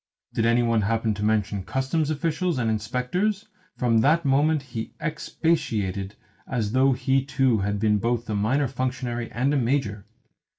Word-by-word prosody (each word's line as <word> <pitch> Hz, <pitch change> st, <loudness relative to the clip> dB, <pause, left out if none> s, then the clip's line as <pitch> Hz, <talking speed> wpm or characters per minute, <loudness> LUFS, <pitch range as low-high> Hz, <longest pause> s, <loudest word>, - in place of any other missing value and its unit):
Did 115 Hz, 0 st, +1 dB
any 120 Hz, +1 st, +3 dB
one 115 Hz, -2 st, +2 dB
happen 110 Hz, +1 st, 0 dB
to 105 Hz, 0 st, -5 dB
mention 105 Hz, -2 st, 0 dB
Customs 135 Hz, -, -1 dB
officials 165 Hz, +2 st, -1 dB
and 115 Hz, -3 st, +1 dB
inspectors, 125 Hz, -, -1 dB, 0.3 s
from 115 Hz, -2 st, +3 dB
that 155 Hz, +7 st, +3 dB
moment 145 Hz, +2 st, +3 dB
he 115 Hz, -4 st, -6 dB
expatiated 115 Hz, -, -1 dB, 0.3 s
as 115 Hz, -5 st, -1 dB
though 130 Hz, +2 st, +4 dB
he 135 Hz, +1 st, +1 dB
too 135 Hz, -4 st, +2 dB
had 100 Hz, +1 st, -1 dB
been 105 Hz, -1 st, +2 dB
both 120 Hz, +2 st, -1 dB
a 110 Hz, -, -2 dB
minor 125 Hz, +8 st, +1 dB
functionary 125 Hz, -2 st, -3 dB
and 130 Hz, +5 st, 0 dB
a -, -, +2 dB
major. 115 Hz, -6 st, -1 dB
120 Hz, 160 wpm, -25 LUFS, 110-140 Hz, 0.3 s, though